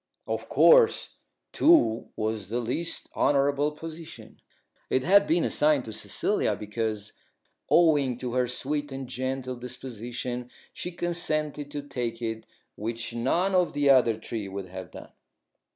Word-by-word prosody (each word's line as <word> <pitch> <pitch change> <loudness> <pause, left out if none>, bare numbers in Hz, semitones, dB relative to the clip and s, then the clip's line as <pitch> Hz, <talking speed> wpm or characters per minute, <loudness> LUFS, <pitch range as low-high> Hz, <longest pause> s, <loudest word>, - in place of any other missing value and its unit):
Of - - -4
course, 480 -2 +5 0.4
Two 300 - +4
was 110 -3 -2
the 120 +2 -1
least 145 +8 -2
honourable 145 +1 +2
position. 160 +1 -10 0.5
It 130 - +1
had 200 +4 +5
been 165 +1 +2
assigned 150 -3 +2
to 110 - -7
Cecilia - - -1
because, 105 0 -3 0.6
owing 145 -7 +4
to 125 -1 -5
her 125 -1 +1
sweet 145 +4 -3
and 135 -1 -6
gentle 130 +1 -3
disposition, 125 0 -6 0.2
she 180 - -5
consented 155 -4 -2
to 145 0 -5
take 120 -5 -4
it 115 -1 -4 0.3
which 115 +2 -3
none 170 +11 +1
of 180 -1 +2
the 145 -1 +4
other 120 -4 +4
three 110 -2 -5
would 95 -1 -6
have 95 0 -8
done. - - -11
130 Hz, 135 wpm, -27 LUFS, 115-150 Hz, 0.6 s, course